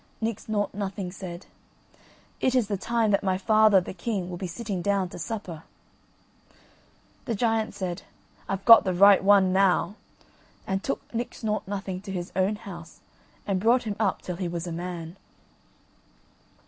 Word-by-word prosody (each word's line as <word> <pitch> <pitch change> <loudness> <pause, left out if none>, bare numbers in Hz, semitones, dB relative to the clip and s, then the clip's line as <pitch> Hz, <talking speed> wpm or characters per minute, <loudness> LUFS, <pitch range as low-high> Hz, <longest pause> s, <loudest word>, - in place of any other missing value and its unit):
Nix 225 -1 -4
Nought 205 -1 -1
Nothing 195 -2 -4
said: 180 -1 -8 0.9
"It 260 0 +1
is 245 -5 +2
the 205 - -1
time 225 +3 0
that 200 - +2
my 190 -2 0
father 215 0 +5
the 180 - -6
king 185 -1 -3
will 175 - -5
be 185 - -4
sitting 195 +1 -4
down 195 -1 0
to - - -9
supper." 185 -6 -5 1.6
The 230 - -1
giant 225 0 0
said: 185 -2 -4 0.5
"I've 195 0 -3
got 230 -1 +9
the 185 -2 -1
right 200 +1 +7
one 195 -2 +5
now;" 195 0 +3 0.7
and 190 0 -1
took 275 - -3
Nix 235 +1 -4
Nought 215 -3 -1
Nothing 195 -2 -4
to 200 -1 -8
his 180 -2 -5
own 190 +3 +1
house 175 -6 -11 0.4
and 195 -2 0
brought 235 +5 +3
him 210 -3 -3
up 200 -4 0
till 180 -2 -5
he 185 -1 -2
was 170 0 -4
a 175 - -5
man. 170 0 -6
195 Hz, 165 wpm, -26 LUFS, 180-215 Hz, 1.6 s, got